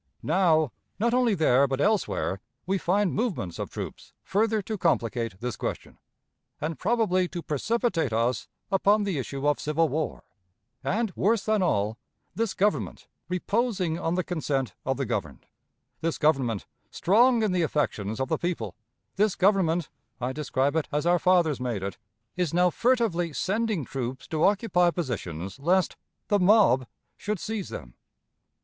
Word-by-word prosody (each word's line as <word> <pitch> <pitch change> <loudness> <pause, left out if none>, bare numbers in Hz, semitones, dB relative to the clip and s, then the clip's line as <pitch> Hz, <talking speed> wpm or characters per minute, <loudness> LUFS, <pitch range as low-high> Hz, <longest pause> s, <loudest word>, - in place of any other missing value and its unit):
Now, 160 -4 +3 0.3
not 235 +3 +1
only 245 -4 +3
there, 140 -5 +4
but 135 0 -2
elsewhere, 195 - 0 0.2
we 190 +1 0
find 195 +2 +1
movements 190 - -2
of - - -3
troops - - -7
further 220 +2 +1
to 220 - -3
complicate 115 - 0
this 125 -1 -3
question, - - -5 0.6
and 155 -1 -3
probably 195 -4 +2
to 175 -1 -6
precipitate 165 - 0
us 115 +1 0 0.2
upon 205 +2 +3
the 190 -8 -1
issue 135 +2 -3
of 145 - +2
civil 155 +1 +1
war; 155 +3 -2 0.6
and, 220 -1 0
worse 215 +3 +2
than 215 -2 +2
all, 110 - 0 0.3
this 225 -3 -1
Government, 205 +2 0 0.2
reposing 185 -2 0
on 165 -1 -1
the 185 - 0
consent 145 -7 -2
of - - +1
the - - -1
governed; - - -4 0.5
this 165 +1 -1
Government, 135 -9 +1 0.2
strong 230 +5 +4
in 210 - +2
the 180 -1 +1
affections 110 -9 -1
of 130 - 0
the 160 - -1
people; 160 - -2 0.4
this 210 0 +3
Government 180 -4 +2 0.3
(I 125 +1 -2
describe 140 0 0
it 160 - 0
as 150 +2 -1
our 175 0 +4
fathers 175 -6 +3
made 120 -6 -2
it) 100 +2 -5 0.4
is 175 -3 -1
now 180 0 +4
furtively 220 -10 +1
sending 205 - -1
troops 130 0 -5
to 160 0 +2
occupy 195 -4 +3
positions 100 - -4
lest 175 +4 +2 0.3
"the 205 - +3
mob" 180 - +5 0.3
should 210 +1 -2
seize 215 -1 -4
them. - - -8
170 Hz, 155 wpm, -27 LUFS, 135-205 Hz, 0.6 s, mob